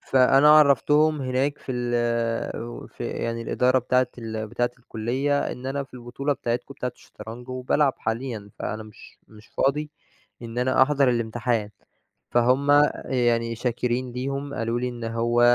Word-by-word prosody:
فأنا 135 +3 +5
عرّفتهم 150 +2 +4
هناك 130 +3 0
في 130 - -6
ال 120 -2 -1
وفي 120 0 -8
يعني 115 0 -3
الإدارة 125 +3 +2
بتاعة 125 +1 +2
ال 110 -1 -4
بتاعة 120 +2 0
الكُلّية 125 +5 -1
إن 125 - -8
أنا 140 +1 -2
في 135 - -19
البطولة 125 +4 -3
بتاعتكم 125 +1 -3
بتاعة 125 -2 -4
الشطرنج 120 +3 -11
وبالعب 130 +2 +1
حاليًا، 110 -2 -4
فأنا 110 +1 -4
مش 110 -1 -15
مش 110 0 -16
فاضي 150 +2 0 0.5
إن 115 0 -6
أنا 130 +1 +3
أحضَر 140 -1 +3
الامتحان، 115 -2 -1 0.6
فهُم 130 +4 +3 0.3
يعني 120 -2 +1
شاكرين 125 +1 -2
ليهم 140 +3 -4
قالوا 115 +1 -1
لي 125 - -1
إن 120 -1 -7
هو 115 +1 0
125 Hz, 145 wpm, -25 LUFS, 115-135 Hz, 0.6 s, فأنا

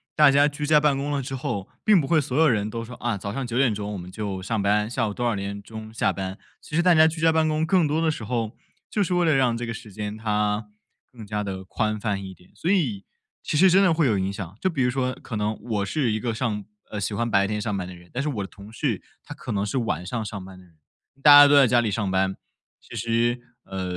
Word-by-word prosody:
大 150 -2 +7
家 140 +1 +5
居 145 0 -4
家 150 0 +5
办 145 -2 +2
公 145 +1 -2
了 140 - 0
之 135 +1 -5
后， 100 -6 -3 0.2
并 210 -4 +5
不 140 - -1
会 160 +1 +4
所 135 -1 -3
有 160 - +5
人 105 -5 +1
都 115 +1 -5
说， 125 +2 -9
“啊， 120 -4 -2
早 100 +1 -5
上 135 +2 -3
9 120 0 -3
点 125 -5 +3
钟 105 0 -4
我 - - -4
们 90 0 -9
就 100 -3 -4
上 105 +2 -2
班， 105 +1 +2
下 120 -1 -1
午 105 - -4
多 120 - -3
少 115 -3 +1
点 100 +1 -5
钟 110 +1 -10
下 - - +1
班“， 95 +1 -5 0.2
其 150 - -7
实 170 - +3
大 180 -1 +6
家 160 0 +6
居 160 +1 -3
家 165 0 +5
办 160 0 +2
公 155 0 +1
更 170 -2 +3
多 155 +3 0
的 160 -1 +2
时 120 - -6
候， 115 -1 -2 0.3
就 210 - -1
是 180 - -1
为 175 -1 +2
了 160 - +4
让 125 -3 +2
这 120 - -4
个 115 - -4
时 110 -2 -10
间 105 +1 -5
它 105 -1 -1 0.4
更 115 -4 -11
加 105 0 -3
地 95 -1 -5
宽 110 +2 -2
泛 100 -2 -2
一 95 - -8
点， 90 0 -22
所 170 - -3
以 125 - 0 0.4
其 - - -2
实 190 +4 +6
真 195 +2 +6
的 180 -4 +4
会 160 -2 +2
有 110 -5 +2
影 95 +1 -1
响。 100 -2 -7
就 185 - +2
比 145 -7 0
如 125 - +2
说 130 0 -1
可 115 - -8
能 105 +1 -1
我 105 -4 -1
是 130 -5 0
一 110 - -1
个 115 0 -2
上 110 -4 -2 0.3
呃， 105 - -3
喜 105 +2 -2
欢 115 +2 -1
白 100 -2 +3
天 105 0 -2
上 105 -2 -2
班 90 -2 -3
的 90 - -9
人， 90 0 -17
但 125 - -1
是 150 - -1
我 105 -8 -3
的 - - -6
同 100 +2 -13
事 120 -6 -1 0.2
他 - - -8
可 - - -7
能 100 -2 0
是 105 +6 -2
晚 110 -6 -2
上 115 +3 -3
上 100 -3 -6
班 95 -1 -12
的 90 - -17
人。 85 -2 -25 0.5
大 145 +1 +8
家 145 0 +11
都 145 - +5
在 135 -3 +7
家 120 0 +4
里 110 - -1
上 100 -1 -1
班， 95 0 0 0.4
其 - - -12
实， 115 +2 +1 0.3
呃， 95 -1 -5
115 Hz, 305 characters per minute, -24 LUFS, 100-140 Hz, 0.5 s, 家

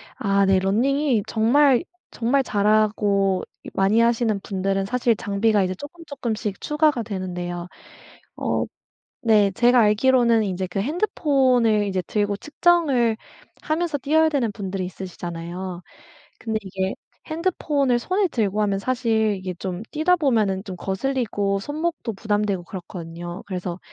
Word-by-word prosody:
아 200 -2 +2
네 190 0 +4
running이 240 +5 +1
정말, 255 +5 +4 0.3
정말 255 +4 +1
잘하고 205 -3 +2 0.2
이 - - -8
많이 195 +4 +3
하시는 230 -2 +2
분들은 195 0 -1
사실 240 +2 +1
장비가 205 0 +1
이제 185 0 -2
쪼끔쪼끔씩 260 - -5
추가가 300 -5 +1
되는데요. 180 -4 -5 0.7
어 - - -1 0.6
네 210 -3 +5
제가 240 +5 +4
알기로는 230 +1 +4
인제 190 -2 -2
그 180 - -6
핸드폰을 255 - +2
이제 190 -2 -1
들고 205 0 -1
측정을 295 - +2 0.5
하면서 315 -1 -1
뛰어야 315 +4 +3
되는 265 -8 0
분들이 195 -2 -4
있으시잖아요. 175 0 -6 0.6
근데 220 -1 -2
이게 190 -1 -3 0.4
핸드폰을 300 -6 0
손에 380 - +1
들고 215 - -1
하면 200 -2 0
사실 225 -3 +1
이게 185 -1 -5
좀 185 +3 -5
뛰다 330 +4 +3
보면은 215 - +1
좀 190 - -6
거슬리고 200 0 -1
손목도 300 -2 -3
부담되고 205 -2 -1
그렇거든요. 175 -1 -8
그래서 180 -2 -4
215 Hz, 320 characters per minute, -23 LUFS, 195-260 Hz, 0.7 s, 네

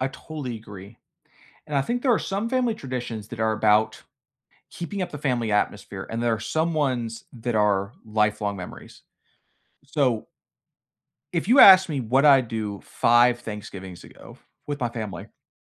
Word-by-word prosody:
I 130 - 0
totally 135 -3 -7
agree. 105 0 -12 0.7
And 150 - -4
I 135 - +3
think 240 - -2
there 255 -2 +3
are - - +1
some 200 +4 -3
family 250 -3 +1
traditions 120 - -6
that 115 - -8
are 110 0 +1
about 110 0 +2 0.7
keeping 195 +3 -6
up 175 - -4
the 150 - -7
family 125 -6 -1
atmosphere, 105 - -2
and 115 +1 -3
there 120 -1 +2
are 105 - -7
some 160 +9 -1
ones 125 -6 -2
that 120 -1 -4
are 100 -1 +1
lifelong 105 -2 0
memories. 90 - -10 0.8
So 135 -6 0 1.1
if 170 -1 -1
you 245 +6 +4
ask 190 -3 +9
me 140 - -2
what 130 +4 +2
I'd 135 -5 +6
do 105 -3 -4
5 120 +1 +3
Thanksgivings 95 -4 -8
ago - - -15 0.3
with 145 0 -4
my 120 - 0
family, 110 -4 -6
I - - -27
120 Hz, 165 wpm, -24 LUFS, 110-150 Hz, 1.1 s, ask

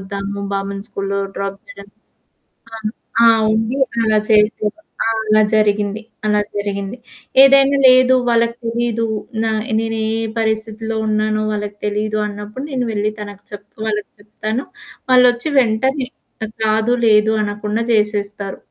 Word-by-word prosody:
ఒద్దాము, 200 +1 -5
బాబుని 195 0 -3
స్కూలులో 200 0 -3 0.2
డ్రాప్ 195 0 -4
చేయడం. 200 0 -12 0.9
ఆ! - - -5 0.5
ఆ! - - +7 0.3
ఉండి 225 +5 -1 0.3
అలా 215 -1 +3
చేసేవారు. 210 +6 +2 0.2
ఆ! - - +2 0.2
అలా 215 0 +5
జరిగింది. 210 0 +1 0.3
అలా 210 0 +3 0.2
జరిగింది. 200 +2 -3 0.5
ఏదైనా 275 0 +5
లేదు, 255 0 +6 0.2
వాళ్ళకి 235 0 +2
తెలీదు, 230 -1 -1 0.4
నా 220 - +1 0.3
నేనే 225 -1 -2 0.3
పరిస్థితిలో 220 0 -2
ఉన్నానో 215 0 0
వాళ్ళకి 205 0 -4
తెలీదు 210 +1 -1
అన్నప్పుడు 210 +5 -7
నేను 250 -2 -1
వెళ్లి 210 +1 0
తనకి 205 -1 -9
చెప్పుకోవాలి 210 +1 -4 0.2
చెప్తాను. 215 +4 -4 0.5
వాళ్ళొచ్చి 250 +2 +4
వెంటనే 255 +4 0 0.4
అట్టా - - -2 0.2
కాదు, 220 +2 +2
లేదు 215 0 +5
అనకుండా 210 +2 -3
జేసేస్తారు. 205 -2 -1
215 Hz, 120 wpm, -18 LUFS, 205-230 Hz, 0.9 s, ఆ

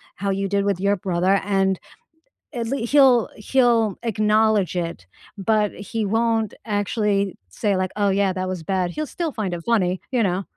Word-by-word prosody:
how 200 +1 -3
you 195 0 -1
did 200 0 0
with 200 -3 0
your 200 +1 +2
brother 185 +1 +1
and, 195 -2 +1 0.7
at 235 -2 -3
lea 240 -2 -2
he'll 260 -4 +5
he'll 230 -3 +2
acknowledge 215 -3 +2
it, 165 - -4 0.3
but 210 +1 +1
he 215 +2 -4
won't 225 0 +1
actually 205 -2 0
say, 200 - -1
like, 185 0 0
"Oh, 205 -1 +2
yeah, 195 0 +2
that 185 0 -3
was 185 -2 -4
bad." 180 +1 -1
He'll 305 +8 -4
still 335 -3 -3
find 200 -6 -2
it 170 - -8
funny, 185 -6 +1
you 250 -3 +1
know? 190 -1 0
200 Hz, 175 wpm, -22 LUFS, 190-225 Hz, 0.7 s, he'll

